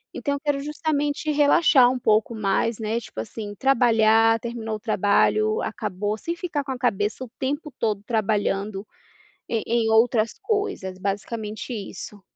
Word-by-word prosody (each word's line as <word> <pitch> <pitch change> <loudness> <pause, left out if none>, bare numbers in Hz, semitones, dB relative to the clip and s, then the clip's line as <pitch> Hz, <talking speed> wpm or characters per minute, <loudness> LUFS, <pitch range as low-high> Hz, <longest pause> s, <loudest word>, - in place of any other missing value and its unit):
Então, 285 - -1
eu - - -5
quero 290 -2 0
justamente 300 0 -1
relaxar 290 -3 +5
um 255 - -1
pouco 220 +1 +2
mais, 215 +2 0
né. 220 +2 -1
Tipo 110 - -7
assim: 205 - -7
Trabalhar 225 -3 +4
terminou 225 -2 -4
o - - -7
trabalho, 215 0 +2
acabou. 210 0 -3
Sem 335 +9 -4
ficar 330 -5 -3
com 270 - -5
a 255 - -3
cabeça 210 +1 0
o 245 - -9
tempo 290 +3 -3
todo 210 -3 0
trabalhando 205 -2 -1 0.6
em 230 - 0
em 230 -1 +1
outras 225 0 +3
coisas. 405 - -2
Basicamente 210 +4 -4
isso. 205 -1 -7
225 Hz, 150 wpm, -24 LUFS, 210-270 Hz, 0.6 s, relaxar